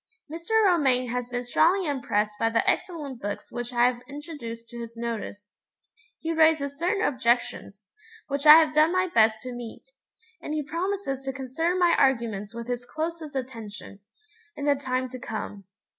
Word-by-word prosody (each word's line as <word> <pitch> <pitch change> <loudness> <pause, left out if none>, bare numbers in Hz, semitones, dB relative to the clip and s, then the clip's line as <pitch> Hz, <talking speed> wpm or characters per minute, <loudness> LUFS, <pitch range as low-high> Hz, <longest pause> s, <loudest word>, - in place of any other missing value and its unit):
Mr. 415 +7 +1
Romayne 265 -9 +3
has 245 0 -3
been 245 0 -3
strongly 350 +9 +3
impressed 210 -7 -1
by 225 - +2
the 230 0 +1
excellent 290 -9 -1
books 205 0 -5
which 240 0 -5
I 240 0 +3
have 245 -1 +1
introduced 275 -6 -8
to 240 - -9
his 230 0 -8
notice. 220 -3 -5 0.6
He 325 0 -3
raises 315 -3 +3
certain 370 +4 0
objections, 235 -5 -1 0.4
which 280 +1 -1
I 300 - +13
have 315 -2 +5
done 305 +2 +5
my 370 0 +1
best 220 -1 +4
to 250 -1 -6
meet; 240 - -9 0.5
and 300 - -4
he 305 - -1
promises 335 -2 -3
to 270 - -1
consider 270 +7 -1
my 350 -2 +4
arguments 230 -6 +1
with 235 0 -6
his 245 0 -3
closest 315 +2 -5
attention, 225 -6 -7 0.6
in 285 - -5
the 290 - +5
time 255 -2 -2
to 255 0 -8
come. 210 -3 -6
260 Hz, 170 wpm, -26 LUFS, 235-315 Hz, 0.6 s, I